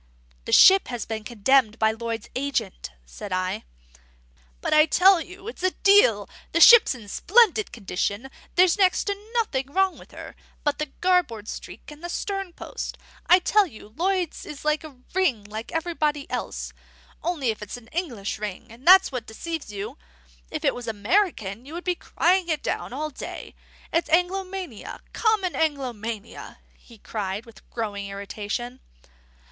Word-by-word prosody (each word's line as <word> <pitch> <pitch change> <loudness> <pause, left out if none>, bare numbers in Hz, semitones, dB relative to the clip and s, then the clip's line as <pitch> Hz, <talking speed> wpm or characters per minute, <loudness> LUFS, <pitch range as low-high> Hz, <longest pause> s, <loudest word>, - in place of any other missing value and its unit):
"This - - +5
ship 385 0 +8
has 245 -3 -4
been 220 -1 -5
condemned 235 +1 +2
by 220 0 +3
Lloyd's 230 0 -5
agent," 250 - -2 0.2
said 195 - -9
I. 185 - -2 0.9
"But - - -1
I 305 +1 +6
tell 370 +2 +5
you 380 +4 -10
it's 455 - -7
a 370 - +3
deal. 365 - +4 0.3
The 335 - +2
ship's 465 - +8
in 225 -4 -12
splendid 430 - +3
condition; 205 +4 -3 0.2
there's 365 +2 +4
next 375 -2 +3
to 410 +2 -5
nothing 275 - -1
wrong 385 +2 +1
with - - -15
her - - -10 0.3
but 295 0 0
the 305 - -1
garboard 340 - +1
streak - - -8
and 300 +2 -13
the 345 - -4
sternpost. 390 -1 -5 0.3
I 360 - +8
tell 405 +2 +3
you 215 -8 -13
Lloyd's 360 0 -1
is 300 0 -9
a 305 -2 -1 0.2
ring 330 - +1
like 215 +5 -7
everybody 315 -4 -1
else; - - -4 0.5
only 305 -9 0
it's 210 +2 -7
an 245 - -15
English 245 - -3
ring, 210 +1 -6
and 245 +7 -14
that's 375 -2 +8
what 250 -3 -5
deceives 320 +4 -6
you. 200 - -6 0.5
If - - -4
it - - +3
was 245 -1 -8
American, 220 - 0
you 295 +5 -10
would 350 - -6
be 360 - +1
crying 355 +1 +1
it 310 -2 -1
down - - -3
all 305 +4 -4
day. - - -8 0.4
It's 335 +1 +1
Anglomania, 360 - -1
common 430 -5 +1
Anglomania," 235 -8 -3 0.2
he 235 - -18
cried, 205 0 -4
with 230 -1 -17
growing 205 -3 -4
irritation. 210 +5 -5
285 Hz, 155 wpm, -25 LUFS, 220-360 Hz, 0.9 s, ship